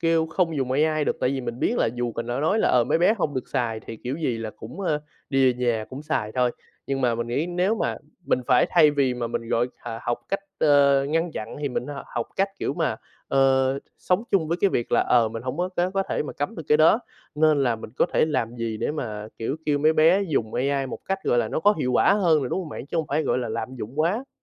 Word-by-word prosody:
kêu 165 Hz, -1 st, +2 dB
không 165 Hz, -1 st, 0 dB
dùng 130 Hz, -2 st, -1 dB
AI 155 Hz, +2 st, +2 dB
được, -, -, 0 dB
tại 125 Hz, -, +2 dB
vì 135 Hz, -1 st, -2 dB
mình 120 Hz, -1 st, -5 dB
biết -, -, +1 dB
là -, -, +3 dB
dù 120 Hz, -1 st, -2 dB
mình 115 Hz, -, -4 dB
đã 120 Hz, +3 st, -2 dB
nói 175 Hz, +8 st, +2 dB
là, -, -, +3 dB
ờ, 120 Hz, -2 st, +4 dB
"mấy -, -, +1 dB
bé 190 Hz, +6 st, +4 dB
hông 145 Hz, -5 st, -1 dB
được 130 Hz, -, -4 dB
xài" 115 Hz, -3 st, -1 dB
thì 115 Hz, -, -8 dB
kiểu 130 Hz, +3 st, -2 dB
gì 130 Hz, -8 st, -1 dB
là 115 Hz, -1 st, -4 dB
cũng, 120 Hz, -, -9 dB
a, 155 Hz, -6 st, 0 dB, 0.3 s
đi 135 Hz, -2 st, +4 dB
về -, -, -11 dB
nhà 110 Hz, -2 st, +1 dB
cũng 135 Hz, +3 st, -7 dB
xài 110 Hz, -9 st, -2 dB
thôi. 125 Hz, 0 st, +2 dB, 0.4 s
Nhưng 135 Hz, -1 st, -1 dB
mà 125 Hz, -3 st, +2 dB
mình 115 Hz, 0 st, -3 dB
nghĩ 140 Hz, +7 st, -1 dB
nếu 180 Hz, +4 st, +1 dB
mà -, -, -1 dB, 0.3 s
mình 130 Hz, -, +1 dB
phải -, -, +4 dB
thay 150 Hz, -, +6 dB
vì 140 Hz, -3 st, +1 dB
mà 120 Hz, -1 st, -3 dB
mình 115 Hz, 0 st, -4 dB
gọi 120 Hz, +2 st, +1 dB, 0.2 s
thà 115 Hz, -1 st, -5 dB
học 120 Hz, -, -1 dB
cách, 195 Hz, -, -1 dB, 0.2 s
ơ, 140 Hz, -2 st, +4 dB
ngăn 165 Hz, +2 st, 0 dB
chặn 110 Hz, -4 st, -6 dB
thì 145 Hz, -, -1 dB
mình 125 Hz, -1 st, -3 dB
á 145 Hz, -, -6 dB
h 140 Hz, -, -7 dB, 0.2 s
học 120 Hz, -, -1 dB
cách 195 Hz, +1 st, +2 dB
kiểu -, -, -2 dB
mà, -, -, 0 dB, 0.3 s
ờ, 135 Hz, 0 st, +3 dB, 0.2 s
sống 180 Hz, +3 st, +1 dB
chung 165 Hz, -6 st, +2 dB
với 170 Hz, -, 0 dB
cái 200 Hz, -, +4 dB
việc 120 Hz, -, -2 dB
là, -, -, +5 dB
ờ, 120 Hz, -2 st, +3 dB
mình 115 Hz, +1 st, -6 dB
hổng 130 Hz, +3 st, -4 dB
có 180 Hz, +1 st, 0 dB
có 180 Hz, +1 st, +1 dB
có 195 Hz, 0 st, 0 dB
thể -, -, 0 dB
mà 150 Hz, -, -6 dB
cấm 145 Hz, +1 st, -3 dB
được 165 Hz, -, -5 dB
cái 150 Hz, -, +6 dB
đó. 165 Hz, +9 st, +5 dB, 0.3 s
Nên 150 Hz, -2 st, +3 dB
là 120 Hz, -3 st, +1 dB
mình 110 Hz, -, -9 dB
có -, -, +3 dB
thể -, -, +4 dB
làm 120 Hz, -6 st, -2 dB
gì 115 Hz, -2 st, -3 dB
để -, -, -1 dB
mà, 110 Hz, -8 st, -5 dB
kiểu, 115 Hz, +6 st, -2 dB
kêu 145 Hz, -1 st, +2 dB
mấy 155 Hz, +2 st, +4 dB
bé 165 Hz, +5 st, +4 dB
dùng 135 Hz, -, -1 dB
AI 135 Hz, +1 st, 0 dB
một 130 Hz, -, -6 dB
cách, 195 Hz, 0 st, -1 dB
gọi 120 Hz, -, +2 dB
là, -, -, +1 dB
nó -, -, -2 dB
có 205 Hz, +4 st, +5 dB
hiệu 125 Hz, -, 0 dB
quả 125 Hz, -, +4 dB
hơn 170 Hz, -7 st, +3 dB
nè, 130 Hz, -, -2 dB
đúng -, -, -1 dB
hông 180 Hz, -4 st, -5 dB
bạn? 145 Hz, -, -7 dB
Chứ 155 Hz, -, -4 dB
hông 160 Hz, -3 st, 0 dB
phải, 155 Hz, +2 st, +1 dB
gọi 125 Hz, -, 0 dB
là, 120 Hz, -3 st, -3 dB
lạm 115 Hz, +3 st, -4 dB
dụng 125 Hz, +6 st, -4 dB
quá. 210 Hz, -, 0 dB
140 Hz, 285 wpm, -24 LUFS, 120-160 Hz, 0.4 s, thay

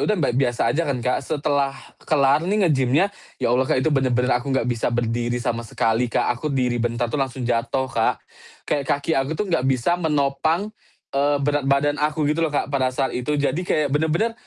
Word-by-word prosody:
udah, 215 Hz, -, +1 dB
ba 150 Hz, -8 st, +1 dB
biasa 120 Hz, -2 st, +1 dB
aja 165 Hz, +2 st, -1 dB
kan, 140 Hz, -, 0 dB
Kak. 125 Hz, -, +1 dB
Setelah 140 Hz, -1 st, -1 dB, 0.3 s
kelar 140 Hz, -1 st, +4 dB
nih 205 Hz, -1 st, +2 dB
nge-gym-nya, 150 Hz, +6 st, +2 dB, 0.2 s
ya 115 Hz, -, 0 dB
Allah, 130 Hz, +1 st, +2 dB
Kak, 130 Hz, -, +1 dB
itu 160 Hz, -, +2 dB
bener-bener 130 Hz, -2 st, +2 dB
aku 125 Hz, +3 st, -1 dB
nggak 130 Hz, -3 st, +1 dB
bisa 120 Hz, -2 st, -1 dB
berdiri 120 Hz, 0 st, -1 dB
sama 120 Hz, -1 st, -2 dB
sekali, 115 Hz, +1 st, 0 dB
Kak, 115 Hz, -, +1 dB
aku 155 Hz, -, -2 dB
diri 125 Hz, -3 st, 0 dB
bentar 120 Hz, +1 st, -1 dB
tuh 145 Hz, -, -1 dB
langsung 130 Hz, -1 st, -3 dB
jatuh, 120 Hz, +2 st, 0 dB
Kak. 115 Hz, -, +1 dB, 0.5 s
Kayak 140 Hz, -2 st, -1 dB
kaki 145 Hz, +3 st, -3 dB
aku 135 Hz, +3 st, 0 dB
tuh 210 Hz, -, -1 dB
nggak 135 Hz, -5 st, +1 dB
bisa 135 Hz, +7 st, +1 dB
menopang, 160 Hz, +5 st, 0 dB, 0.4 s
eee, 145 Hz, +1 st, +2 dB
berat 145 Hz, -1 st, 0 dB
badan 145 Hz, +1 st, +2 dB
aku 150 Hz, +1 st, 0 dB
gitu 150 Hz, +3 st, +1 dB
loh, 165 Hz, -, +2 dB
Kak, 145 Hz, -1 st, -2 dB
pada 130 Hz, -2 st, +2 dB
saat 130 Hz, +1 st, -1 dB
itu. 125 Hz, +4 st, -1 dB
Jadi 145 Hz, +2 st, 0 dB
kayak 155 Hz, -6 st, 0 dB
bener-bener 160 Hz, +9 st, +1 dB
140 Hz, 205 wpm, -22 LUFS, 125-150 Hz, 0.5 s, kelar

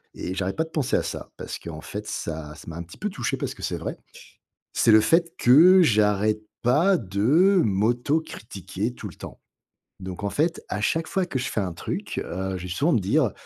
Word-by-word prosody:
et 90 Hz, -, -4 dB
j'arrête 95 Hz, 0 st, -2 dB
pas 160 Hz, -, +1 dB
de 160 Hz, -, -11 dB
penser 150 Hz, -6 st, 0 dB
à -, -, +2 dB
ça -, -, -6 dB
parce -, -, -6 dB
qu'en 80 Hz, -2 st, -8 dB
fait, 105 Hz, +1 st, -6 dB
ça 75 Hz, -2 st, -5 dB
ça -, -, -14 dB
m'a 80 Hz, 0 st, -6 dB
un 85 Hz, -, -5 dB
petit 85 Hz, -, -14 dB
peu 210 Hz, -, -2 dB
touché 130 Hz, -, -2 dB
parce -, -, -3 dB
que -, -, -11 dB
c'est -, -, -2 dB
vrai. -, -, -5 dB, 0.8 s
C'est 115 Hz, -, +4 dB
le 110 Hz, -, +8 dB
fait 170 Hz, +7 st, +2 dB
que 175 Hz, +9 st, +7 dB
j'arrête 105 Hz, -, +2 dB, 0.2 s
pas 160 Hz, +11 st, +4 dB
de 145 Hz, -, +3 dB
m'autocritiquer 110 Hz, -, -1 dB
tout 105 Hz, -, -7 dB
le 85 Hz, -, -12 dB
temps. -, -, -10 dB, 0.6 s
Donc 95 Hz, 0 st, -7 dB
en 100 Hz, -, 0 dB
fait, 165 Hz, -, 0 dB
à 105 Hz, -, -2 dB
chaque 160 Hz, +8 st, 0 dB
fois 190 Hz, -2 st, 0 dB
que 135 Hz, -7 st, -3 dB
je 130 Hz, +1 st, -2 dB
fais -, -, -2 dB
un 95 Hz, -4 st, -2 dB
truc, 85 Hz, -, -4 dB
heu, 95 Hz, +1 st, -4 dB
je 90 Hz, -, -8 dB
vais 90 Hz, -, -6 dB
souvent 145 Hz, -, +1 dB
me 115 Hz, -, +3 dB
dire: 115 Hz, +4 st, +2 dB
110 Hz, 220 wpm, -25 LUFS, 95-155 Hz, 0.8 s, le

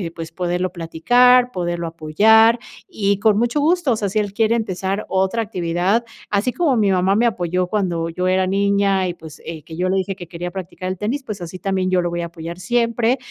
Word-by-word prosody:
pues 165 Hz, -1 st, -7 dB
poderlo 180 Hz, +1 st, -2 dB
platicar, 245 Hz, +9 st, +3 dB
poderlo 175 Hz, -3 st, -3 dB
apoyar, 220 Hz, +9 st, +4 dB, 0.3 s
y 200 Hz, -1 st, 0 dB
con 210 Hz, -1 st, +3 dB
mucho 240 Hz, +6 st, +1 dB
gusto, 330 Hz, -1 st, +2 dB
o 230 Hz, -, +3 dB
sea, 205 Hz, -, -1 dB
si 205 Hz, +3 st, 0 dB
él 205 Hz, -2 st, -2 dB
quiere 225 Hz, +1 st, +2 dB
empezar 195 Hz, -2 st, -2 dB
otra 190 Hz, +4 st, +1 dB
actividad, 185 Hz, +2 st, 0 dB, 0.2 s
así 210 Hz, +5 st, 0 dB
como 310 Hz, -8 st, +1 dB
mi 210 Hz, -3 st, +3 dB
mamá 190 Hz, +1 st, +2 dB
me 235 Hz, -, +3 dB
apoyó 180 Hz, -4 st, 0 dB
cuando 175 Hz, -5 st, -1 dB
yo 180 Hz, +2 st, -2 dB
era 185 Hz, 0 st, +2 dB
niña 195 Hz, -1 st, +1 dB
y, -, -, -3 dB
pues, 160 Hz, -2 st, -13 dB
eh, 160 Hz, -2 st, -6 dB
que 160 Hz, +1 st, -10 dB
yo 180 Hz, +2 st, -1 dB
le 190 Hz, -, +1 dB
dije 190 Hz, +1 st, -2 dB
que 175 Hz, -2 st, -10 dB
quería 175 Hz, +1 st, -6 dB
practicar 185 Hz, -1 st, -7 dB
el 185 Hz, -, -3 dB
tenis, 245 Hz, +8 st, -2 dB
pues 205 Hz, -5 st, -7 dB
así 175 Hz, +1 st, -7 dB
también 190 Hz, -1 st, -1 dB
yo 185 Hz, -, +3 dB
lo 175 Hz, -, -1 dB
voy 170 Hz, 0 st, -3 dB
a 170 Hz, -, -3 dB
apoyar 170 Hz, +1 st, -8 dB
siempre, 235 Hz, +3 st, +1 dB
190 Hz, 215 wpm, -20 LUFS, 175-220 Hz, 0.3 s, apoyar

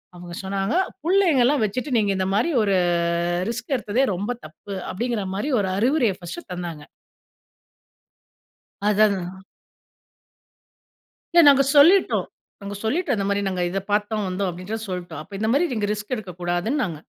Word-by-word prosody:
அவங்க 175 Hz, -1 st, -9 dB
சொன்னாங்க 195 Hz, -, -1 dB, 0.3 s
''புள்ளைங்கல்லாம் 295 Hz, -, +3 dB
வச்சுட்டு 250 Hz, +5 st, -2 dB
நீங்க 200 Hz, -2 st, +1 dB
இந்த 185 Hz, 0 st, 0 dB
மாரி 285 Hz, +11 st, +2 dB
ஒரு 200 Hz, -2 st, +2 dB, 0.8 s
ரிஸ்க் 245 Hz, +4 st, -4 dB
எடுத்ததே 235 Hz, +4 st, 0 dB
ரொம்ப 205 Hz, +6 st, -3 dB
தப்பு'' 190 Hz, +5 st, -8 dB
அப்டிங்கிற 230 Hz, 0 st, -2 dB
மாரி 275 Hz, +9 st, -2 dB
ஒரு 190 Hz, -, -1 dB
அறிவுரைய 240 Hz, -2 st, +2 dB
ஃபர்ஸ்ட்டு 180 Hz, -, -8 dB
தந்தாங்க. 170 Hz, -4 st, -6 dB, 2.0 s
அத 210 Hz, +1 st, +1 dB
அதான். 190 Hz, -1 st, -4 dB, 1.9 s
இல்ல 340 Hz, -, +7 dB
நாங்க 275 Hz, -1 st, +6 dB
சொல்லிட்டோம் 350 Hz, +7 st, +5 dB, 0.4 s
நாங்க 200 Hz, 0 st, -6 dB
சொல்லிட்டோம் 280 Hz, 0 st, 0 dB
"இந்த 200 Hz, -, -1 dB
மாரி 200 Hz, 0 st, +1 dB
நாங்க 180 Hz, -1 st, -2 dB
இத 195 Hz, -, -1 dB
பார்த்தோம் 210 Hz, 0 st, 0 dB
வந்தோம்" 185 Hz, +1 st, -1 dB
அப்டின்னு 200 Hz, +6 st, -6 dB
சொல்லிட்டோம். 175 Hz, -4 st, -5 dB
அப்ப 185 Hz, +6 st, -21 dB
இந்த 220 Hz, -, 0 dB
மாரி 340 Hz, +5 st, +3 dB, 0.3 s
ரிஸ்க் 210 Hz, +4 st, -4 dB
எடுக்க 185 Hz, -5 st, -8 dB
கூடாதுன்னு 175 Hz, +12 st, 0 dB
நாங்க. 160 Hz, -5 st, -5 dB
205 Hz, 140 wpm, -23 LUFS, 185-250 Hz, 2.0 s, இல்ல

